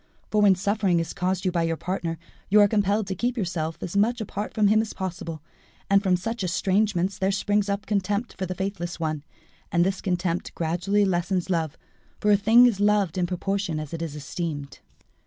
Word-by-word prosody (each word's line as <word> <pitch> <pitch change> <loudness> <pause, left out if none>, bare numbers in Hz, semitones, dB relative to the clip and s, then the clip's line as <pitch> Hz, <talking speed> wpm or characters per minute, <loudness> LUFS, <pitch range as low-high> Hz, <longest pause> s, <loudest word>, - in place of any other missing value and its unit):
For, 210 - +3
when 200 -2 +6
suffering 195 -2 +1
is 165 -1 -3
caused 185 0 -1
you 185 - +2
by 170 -1 0
your 165 0 0
partner, 170 -2 -3 0.3
you 210 +2 +6
are 205 - +7
compelled 205 0 +1
to 190 - -3
keep 245 +6 -2
yourself 170 -5 -2
as 180 - -5
much 230 +5 +2
apart 210 -1 -4
from 210 -2 +2
him 215 +2 +4
as 220 - -5
possible; 170 -4 -5 0.5
and 200 0 +6
from 190 -2 +2
such 225 +4 -3
estrangement 190 +1 +1
there 190 0 +2
springs 205 +1 +1
up 200 +1 -2
contempt 205 +2 -1
for 190 - -3
the 185 - -4
faithless 185 -3 -4
one; 155 -3 -2 0.5
and 170 0 +3
this 190 0 -1
contempt 180 -2 -2
gradually 175 +5 +1
lessens 180 0 0
love, 160 -4 -1 0.4
for 210 - +2
a - - +7
thing 225 +5 +6
is 230 -5 +2
loved 205 -4 +2
in 180 -1 0
proportion 185 -2 -2
as 155 0 -7
it 165 - -4
is 160 -3 -4
esteemed." 150 -1 -5
190 Hz, 200 wpm, -25 LUFS, 170-205 Hz, 0.5 s, are